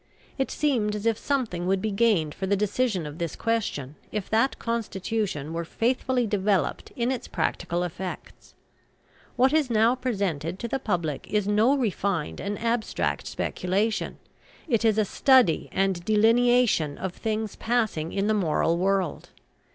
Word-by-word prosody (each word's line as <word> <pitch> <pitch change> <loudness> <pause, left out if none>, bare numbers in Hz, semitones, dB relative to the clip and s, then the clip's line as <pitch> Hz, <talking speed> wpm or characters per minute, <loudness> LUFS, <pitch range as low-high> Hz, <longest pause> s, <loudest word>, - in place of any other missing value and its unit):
It 270 - 0
seemed 235 -8 0
as 210 +1 -5
if 230 -1 +3
something 225 -11 -1
would 190 0 +2
be 215 +2 -2
gained 195 -8 +2
for 190 - -4
the 200 - +3
decision 210 -2 0
of 150 +3 -8
this 170 -2 -3
question 210 - -2 0.2
if 210 -3 -4
that 225 +5 +2
constitution 205 - -2
were 170 0 -2
faithfully 250 +6 0
developed 200 -2 0
in 240 +1 0
its 255 - -4
practical 175 +1 -1
effects. 180 +1 -7 0.8
What 260 +3 +3
is 310 -4 +2
now 225 +1 +4
presented 195 - -2
to 235 - -4
the 270 - -2
public 170 - -2
is 210 -2 +1
no 220 +7 +3
refined 200 - -1
and 200 +1 -3
abstract 230 0 -1
speculation; 200 +5 -1 0.5
it 230 -6 +1
is 220 -2 +3
a 215 - +3
study 255 - +3
and 190 -2 0
delineation 225 -6 +3
of 190 -2 -4
things 220 0 -3
passing 220 -9 -1
in 200 0 -1
the 215 - +2
moral 170 -3 +1
world. 190 -3 0
210 Hz, 150 wpm, -26 LUFS, 180-235 Hz, 0.8 s, now